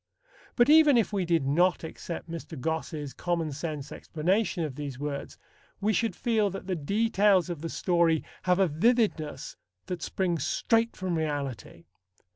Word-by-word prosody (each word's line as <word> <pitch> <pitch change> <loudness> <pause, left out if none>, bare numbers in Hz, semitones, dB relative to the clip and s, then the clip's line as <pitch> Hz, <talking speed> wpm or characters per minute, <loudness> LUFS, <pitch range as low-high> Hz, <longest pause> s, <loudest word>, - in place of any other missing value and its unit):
But 240 - +5
even 300 -3 +7
if 220 -2 +1
we 195 -3 0
did 165 -4 +1
not 175 +7 +2
accept 165 +1 -6
Mr. 165 -2 -7
Gosse's 155 -1 -3
common 170 -3 -2
sense 150 -1 -5
explanation 180 +3 -1
of 150 -4 -3
these 140 -2 -6
words, 140 0 -5 0.4
we 215 +2 +1
should 220 -2 0
feel 220 -4 +1
that 195 0 -7
the 190 - -2
details 200 +1 +2
of 165 -4 -6
the 165 - -4
story 170 -3 +2 0.2
have 180 -1 +2
a 190 -1 +4
vividness 160 - 0 0.3
that 180 -2 -5
springs 175 -7 -1
straight 230 0 +1
from 185 -2 -2
reality. 140 - -4
170 Hz, 155 wpm, -28 LUFS, 150-200 Hz, 0.4 s, even